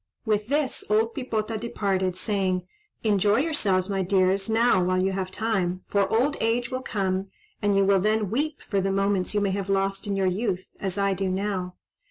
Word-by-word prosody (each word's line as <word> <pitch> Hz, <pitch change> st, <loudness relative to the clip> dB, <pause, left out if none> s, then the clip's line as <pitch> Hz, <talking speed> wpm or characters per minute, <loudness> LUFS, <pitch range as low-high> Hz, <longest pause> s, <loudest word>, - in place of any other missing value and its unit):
With 210 Hz, -1 st, 0 dB
this 285 Hz, 0 st, 0 dB
old 220 Hz, +2 st, +2 dB
Pipota 225 Hz, -4 st, -2 dB
departed, 195 Hz, -5 st, -1 dB
saying, 185 Hz, -3 st, -1 dB, 0.4 s
"Enjoy 205 Hz, -1 st, +3 dB
yourselves, 210 Hz, -, +1 dB
my 195 Hz, -1 st, -1 dB
dears, 190 Hz, +1 st, +2 dB
now 225 Hz, -4 st, +3 dB
while 185 Hz, +1 st, +1 dB
you 190 Hz, +1 st, +1 dB
have 190 Hz, -1 st, -2 dB
time, 190 Hz, -3 st, -1 dB
for 200 Hz, -1 st, +1 dB
old 260 Hz, +6 st, +2 dB
age 235 Hz, +2 st, 0 dB
will 255 Hz, 0 st, -2 dB
come 195 Hz, -5 st, -1 dB, 0.3 s
and 205 Hz, -1 st, +2 dB
you 195 Hz, -, +4 dB
will 195 Hz, 0 st, +4 dB
then 210 Hz, 0 st, +1 dB
weep 295 Hz, +5 st, -1 dB
for 200 Hz, -2 st, -1 dB
the 195 Hz, +1 st, 0 dB
moments 195 Hz, 0 st, 0 dB
you 205 Hz, -, +2 dB
may 200 Hz, -1 st, +1 dB
have 195 Hz, 0 st, -3 dB
lost 195 Hz, 0 st, 0 dB
in 200 Hz, -, -1 dB
your 195 Hz, -1 st, +1 dB
youth, 185 Hz, 0 st, -1 dB
as 190 Hz, -1 st, -3 dB
I 200 Hz, -1 st, +2 dB
do 190 Hz, 0 st, -1 dB
now. 185 Hz, -1 st, -2 dB
200 Hz, 195 wpm, -25 LUFS, 190-220 Hz, 0.4 s, you